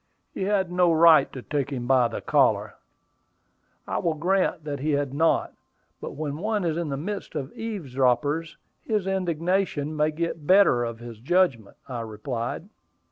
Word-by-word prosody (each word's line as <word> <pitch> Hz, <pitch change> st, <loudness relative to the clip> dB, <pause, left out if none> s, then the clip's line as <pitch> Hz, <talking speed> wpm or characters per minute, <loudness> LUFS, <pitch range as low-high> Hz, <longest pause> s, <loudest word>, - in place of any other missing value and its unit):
"He 190 Hz, -, -3 dB
had 195 Hz, -3 st, 0 dB
no 180 Hz, -1 st, +3 dB
right 160 Hz, -3 st, +6 dB
to 130 Hz, -, -8 dB
take 140 Hz, -3 st, -2 dB
him 125 Hz, -4 st, -4 dB
by 125 Hz, -1 st, +4 dB
the 115 Hz, -, -6 dB
collar." -, -, +2 dB, 1.1 s
"I -, -, -1 dB
will 165 Hz, -2 st, 0 dB
grant 180 Hz, 0 st, 0 dB
that 145 Hz, -2 st, -4 dB
he 150 Hz, +2 st, 0 dB
had 140 Hz, -2 st, -1 dB
not; 160 Hz, +3 st, +1 dB, 0.5 s
but -, -, -6 dB
when 145 Hz, -1 st, -4 dB
one 210 Hz, +1 st, -1 dB
is 160 Hz, -2 st, 0 dB
in 170 Hz, -2 st, -2 dB
the 135 Hz, -, -2 dB
midst 200 Hz, +7 st, -5 dB
of 135 Hz, 0 st, -4 dB
eavesdroppers, 150 Hz, -, -1 dB, 0.3 s
his 215 Hz, -4 st, -1 dB
indignation 180 Hz, -4 st, -1 dB
may 150 Hz, 0 st, +2 dB
get 165 Hz, +2 st, -3 dB
the 150 Hz, -, -15 dB
better 185 Hz, -11 st, +5 dB
of 115 Hz, -1 st, -4 dB
his 120 Hz, -2 st, -9 dB
judgment," 135 Hz, -, +1 dB
I 125 Hz, -3 st, -5 dB
replied. 115 Hz, -, -5 dB
155 Hz, 170 wpm, -25 LUFS, 135-180 Hz, 1.1 s, right